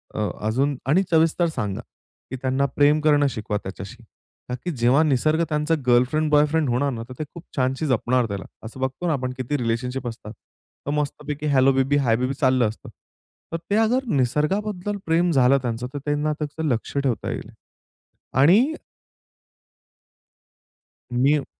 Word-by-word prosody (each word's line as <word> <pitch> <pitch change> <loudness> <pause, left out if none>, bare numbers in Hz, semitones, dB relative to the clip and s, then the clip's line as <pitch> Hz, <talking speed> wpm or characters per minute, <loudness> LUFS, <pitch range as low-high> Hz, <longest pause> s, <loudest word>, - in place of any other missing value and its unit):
अ, - - -3 0.3
अजून 135 +5 +1
आणि 175 +7 +4
सविस्तर 165 +2 +3
सांगा 100 -2 -3 0.5
की - - -3
त्यांना 130 +1 +1
प्रेम 145 +1 +4
करणं 145 -2 +4
शिकवा 110 -4 -3
त्याच्याशी. 100 +5 -8 0.5
ता 125 - -2
की 180 - -1
जेव्हा 130 +1 +3
निसर्ग 155 +3 +2
त्यांचा 150 +2 +1
गर्लफ्रेंड 130 +6 +3
बॉयफ्रेंड 150 0 +3
होणार 135 +4 +1
ना 115 -1 -5
तर - - -7
ते 155 - -1
खूप 170 - -10
छानशी 135 +3 0
जपणार, 125 0 +1
त्याला 100 -2 -5 0.2
असं 115 +4 -9
बघतो 130 +7 -2
ना 165 - +2
आपण 130 -3 -2
किती 130 +3 -2
रिलेशनशिप 125 +1 -2
असतात. 115 -2 -7
तर 135 - -11
मस्तपैकी 150 0 -3
हेल्लो 135 0 +5
बेबी, 135 +2 +2
हाय 125 -5 +2
बेबी 130 +2 -1
चाललं 130 -4 +2
असतं. 110 - -10 0.6
तर - - 0
ते 205 - +2
अगर 240 +4 +2
निसर्गाबद्दल 185 - 0
प्रेम 170 +2 +2
झालं 135 -2 +4
त्यांचं 120 0 -3
तर - - -4
त्यांना 150 +1 0
त्याचं 150 +1 -4
लक्ष 120 +1 -2
ठेवता 135 -5 -1
येईल. - - -6 0.8
आणि 195 - +5 2.4
मी 135 +3 +2
140 Hz, 155 wpm, -23 LUFS, 125-155 Hz, 2.4 s, हेल्लो